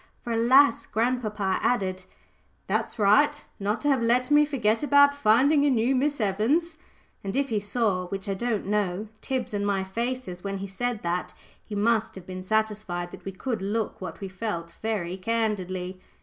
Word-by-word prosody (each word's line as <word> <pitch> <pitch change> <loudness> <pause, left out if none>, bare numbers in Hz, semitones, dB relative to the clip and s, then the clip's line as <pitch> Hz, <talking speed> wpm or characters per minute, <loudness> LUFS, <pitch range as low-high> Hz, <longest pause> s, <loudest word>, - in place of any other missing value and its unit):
For, 240 - -4
alas! 240 +3 +4
grandpapa 215 -4 0
added 185 -6 0 0.6
"That's - - -1
right 285 +9 +3
not 205 +3 -1
to 290 - -1
have 270 -4 +3
let 250 +3 +2
me 295 0 +6
forget 230 -7 0
about 285 -1 +5
finding 280 +3 +4
a 290 - +4
new 250 +1 +2
Miss 285 +2 0
Evans;" 260 - 0 0.4
and 195 0 -4
if 275 0 +1
he 220 -3 +1
saw 205 -3 0
which 195 +1 -5
I 195 - 0
don't 225 +1 -2
know 205 0 -1
Tib's 260 -4 -3
and 205 -1 -1
my 200 -1 0
faces 225 -2 -4
when 195 0 -3
he 195 - -5
said 220 +4 -3
that, 175 +1 -2 0.3
he 210 - -7
must 225 +2 +1
have 190 -2 -10
been 185 0 -6
satisfied 210 -4 -1
that - - -12
we 195 - -3
could 220 +3 -4
look 210 +2 -2
what 180 -1 -7
we 195 - -4
felt 185 -4 -5
very 190 -5 -2
candidly. 185 -4 -2
215 Hz, 180 wpm, -26 LUFS, 190-245 Hz, 0.6 s, me